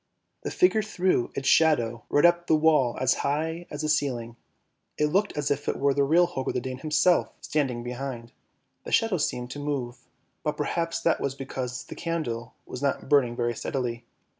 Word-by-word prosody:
The - - -3
figure 360 -12 +3
threw 185 - 0
its 135 - -3
shadow 120 -9 +3
right 145 - +4
up 175 0 +4
the 160 - +5
wall 150 -6 +3
as 130 0 +3
high 160 +4 -2
as 145 - -5
the - - 0
ceiling, 125 -6 -1 0.6
it 150 0 +1
looked 200 +1 +1
as 145 -1 0
if 145 +1 -1
it - - -1
were 140 0 +2
the 140 +1 +2
real 165 +5 +4
Holger 150 -7 -3
the - - -1
Dane 130 0 -6
himself 155 +4 +2
standing 130 -6 -1
behind; 120 -1 -5 0.5
the - - -7
shadow 225 -5 +3
seemed 125 -3 -2
to 145 - -6
move, 130 -4 -3 0.4
but 150 - -2
perhaps 165 +2 -1
that 165 - +1
was 135 -1 -2
because 130 -2 -5
the - - -9
candle 125 -9 -4
was 125 - -7
not 140 -1 -1
burning 125 -5 +4
very 120 0 0
steadily. 120 -2 -3
140 Hz, 190 wpm, -26 LUFS, 125-160 Hz, 0.6 s, the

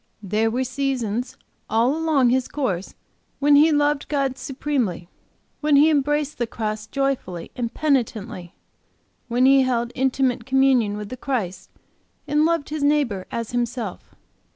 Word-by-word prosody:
There 215 +3 +1
were 250 +3 -1
seasons, 250 -3 -2 0.3
all 230 +6 +2
along 310 -6 +2
his 260 0 +1
course, 195 -11 -3 0.4
when 285 +1 +4
he 305 +3 +6
loved 290 -1 +1
God 275 -3 0
supremely; 260 - -3 0.5
when 300 -1 +2
he 300 +3 +6
embraced 295 0 0
the 240 - 0
cross 215 -1 -4
joyfully 270 -12 -2
and 235 -2 -3
penitently; 230 - -2 0.7
when 245 +1 +2
he 270 0 +6
held 240 -2 0
intimate 260 -2 0
communion 260 -6 +3
with 210 +4 -7
Christ, 190 -9 -3 0.6
and 300 +1 +2
loved 330 -3 0
his 305 0 -4
neighbor 285 -10 +1
as 230 -1 -4
himself. 240 -4 -4
255 Hz, 135 wpm, -23 LUFS, 225-285 Hz, 0.7 s, he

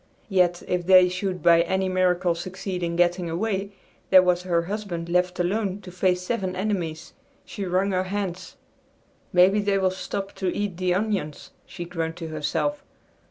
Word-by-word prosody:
Yet 180 -3 +2
if 180 -1 -1
they 185 -1 +7
should 185 0 -3
by 170 -1 +6
any 190 +2 0
miracle 185 -1 +2
succeed 185 +2 -5
in 170 -1 -2
getting 175 0 +1
away, 200 +3 -2 0.4
there 185 -1 +8
was 180 -1 +2
her 170 -2 0
husband 180 -3 -4
left 180 +1 +1
alone 195 +2 -1
to 180 - -10
face 180 0 +1
seven 190 -3 -2
enemies. 180 -5 -3 0.3
She 200 - -5
wrung 185 +2 +1
her 185 0 0
hands. 185 -2 -4 0.8
"Maybe 185 +3 +5
they 200 -1 +1
will 190 -1 +2
stop 195 +1 -5
to 190 - -2
eat 205 -4 -2
the 180 -1 +1
onions," 195 -7 -2 0.2
she 175 -2 -7
groaned 165 -2 -3
to 165 -2 -7
herself. 155 - -2
185 Hz, 165 wpm, -25 LUFS, 175-195 Hz, 0.8 s, there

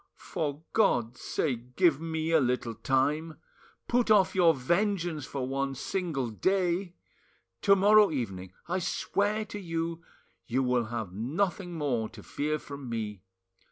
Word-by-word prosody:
For 150 0 -4
God's 120 - +2
sake, 125 -3 -2
give 165 -6 +4
me 160 0 -2
a 165 - +6
little 125 -3 0
time; 150 +7 0 0.5
put 240 -1 +2
off 205 -3 +5
your 170 -4 +5
vengeance 170 +1 0
for 130 -2 -3
one 135 0 -1
single 140 -5 -2
day! 180 - 0 0.7
To 200 -1 +6
morrow 205 +2 +6
evening, 95 - -4 0.2
I 180 +2 0
swear 205 +3 0
to 205 - -7
you, 165 -2 -3 0.5
you 130 +3 +1
will 125 -2 +1
have 110 -5 -5
nothing 175 - -2
more 125 -8 -1
to 110 -3 -12
fear 150 +1 -2
from 140 -3 -8
me. 105 -4 -4
155 Hz, 140 wpm, -29 LUFS, 125-180 Hz, 0.7 s, a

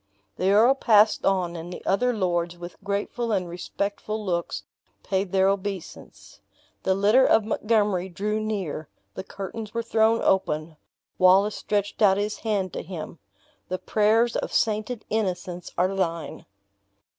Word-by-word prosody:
The 185 - +1
earl 220 +6 +6
passed 215 -5 +4
on, 180 -3 +1
and 170 +1 -7
the - - -9
other 245 +6 +2
lords, 175 -5 -1
with 175 0 -9
grateful 205 +4 -2
and 190 -4 0
respectful 200 +4 -4
looks, 170 -2 -2 0.4
paid 190 -1 -1
their 190 0 +3
obeisance. 195 -2 -5 0.4
The 190 - +1
litter 210 +7 +4
of 220 -4 +4
Montgomery 210 -4 +1
drew 210 +4 -2
near 195 -8 -3 0.2
the - - -6
curtains 205 +3 -7
were 230 - -1
thrown 225 0 +3
open 155 -4 0 0.4
Wallace 190 +3 +5
stretched 205 0 -2
out 195 -2 +5
his 210 +1 -2
hand 200 -5 -1
to - - -4
him: 170 -1 -8 0.5
"The 185 - -1
prayers 220 +4 +2
of - - -2
sainted 215 +1 -1
innocence 180 -4 -2
are 185 +2 +2
thine!" 170 -4 -3
200 Hz, 145 wpm, -25 LUFS, 180-215 Hz, 0.5 s, earl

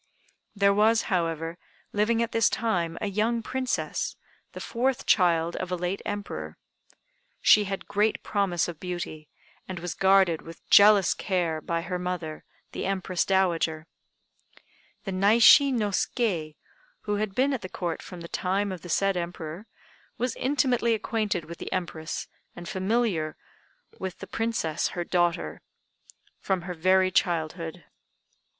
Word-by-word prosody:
There 200 0 +4
was, 220 +2 +4
however, 165 -1 -1 0.3
living 225 +3 +2
at 230 - -4
this 225 -2 +3
time 175 -7 -1
a - - -1
young 220 +3 0
Princess, 255 +1 -2 0.4
the - - -7
fourth 255 +2 -1
child 170 -3 +3
of 185 -1 -4
a - - +1
late 180 +2 -3
Emperor. 80 - -5 0.8
She 210 -1 +6
had 195 0 -5
great 210 +2 +1
promise 195 -5 0
of 170 -3 -7
beauty, 175 -4 -6 0.4
and 185 - -5
was 175 0 -4
guarded 190 -4 +4
with 165 0 -13
jealous 205 -2 +7
care 170 -5 -1
by 170 +1 -2
her 180 0 -3
mother, 175 -4 -4 0.3
the - - -3
Empress 185 -2 0
Dowager. 170 -5 +1 1.2
The 195 - -4
Naishi 225 +8 +6
no 215 -5 0
Ske, 180 - -1 0.5
who 205 -1 -2
had 205 -2 -2
been 275 +2 +2
at 260 - -2
the 185 - -7
Court 170 -3 -3
from 180 -2 -10
the 170 - -7
time 195 +3 -1
of 185 -3 -6
the 175 - -10
said 195 +3 +2
Emperor, 170 +2 -5 0.5
was 250 -1 -1
intimately 250 -4 +1
acquainted 210 -5 -2
with 170 +1 -9
the - - -6
Empress 170 -3 -4 0.3
and 175 0 -9
familiar 190 -5 0 0.6
with 190 -1 -5
the - - -8
Princess, 225 -9 -1
her 175 - 0
daughter, 175 - 0 0.8
from 190 -3 -1
her 180 0 -5
very 185 +2 +3
childhood. 170 -1 -1
185 Hz, 145 wpm, -27 LUFS, 170-210 Hz, 1.2 s, jealous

